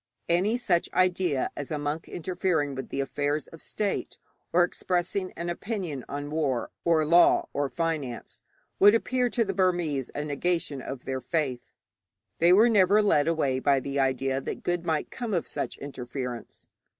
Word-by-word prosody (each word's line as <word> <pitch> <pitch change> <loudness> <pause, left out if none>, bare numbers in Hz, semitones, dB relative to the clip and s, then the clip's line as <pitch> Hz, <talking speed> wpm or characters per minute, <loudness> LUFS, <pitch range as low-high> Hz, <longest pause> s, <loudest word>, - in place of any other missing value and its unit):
Any 190 +7 +2
such 180 -8 +1
idea 180 -6 +1
as 145 - -5
a 155 - -2
monk 145 +2 -3
interfering 170 -5 -1
in 135 - -5
the 140 - -2
affairs 145 +2 -1
of 165 - -13
state, 205 -2 -2 0.3
or 175 +1 +5
expressing 180 +1 -1
an 170 - -5
opinion 175 - -4
on 145 +1 -5
war 145 -6 -1
or 165 -2 +3
law 170 +3 +5
or 140 0 0
finance, 155 -8 -3 0.4
would 205 +3 +8
appear 250 +2 +1
to 230 -1 +1
the 195 - -2
Burmese 175 -8 0
a 145 - -2
negation 150 -1 -1
of 135 -1 -7
their 130 -1 -3
faith. 140 -7 -1 0.8
They 170 +2 +5
were 210 +6 +7
never 210 -1 +5
led 150 -8 +3
away 145 -6 +1
by 140 0 +3
the 140 +1 -3
idea 135 0 +1
that - - -5
good 175 -1 -1
might 160 -2 -1
come 235 -5 -3
of 170 - 0
such - - -4
interference. 125 -3 -6
160 Hz, 165 wpm, -27 LUFS, 140-180 Hz, 0.8 s, would